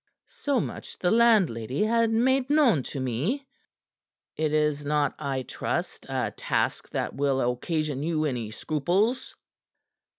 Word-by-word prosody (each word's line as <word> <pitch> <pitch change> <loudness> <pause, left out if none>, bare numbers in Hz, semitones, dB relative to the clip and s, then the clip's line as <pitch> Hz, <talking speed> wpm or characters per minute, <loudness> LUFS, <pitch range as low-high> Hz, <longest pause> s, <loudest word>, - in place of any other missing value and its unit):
"So 290 - -1
much - - -6
the 180 - +1
landlady 190 - +3
had 230 +1 +2
made 255 +4 +2
known 280 - +4
to 140 - -5
me." 140 - -1 0.9
"It 155 -1 0
is 150 -1 +1
not, 145 -1 +1
I 135 -3 -2
trust, - - -4
a - - -1
task - - -1
that - - -2
will 140 -1 +1
occasion 150 +2 -2
you 155 0 0
any 120 -7 -2
scruples." 175 - -1
155 Hz, 130 wpm, -27 LUFS, 140-230 Hz, 0.9 s, known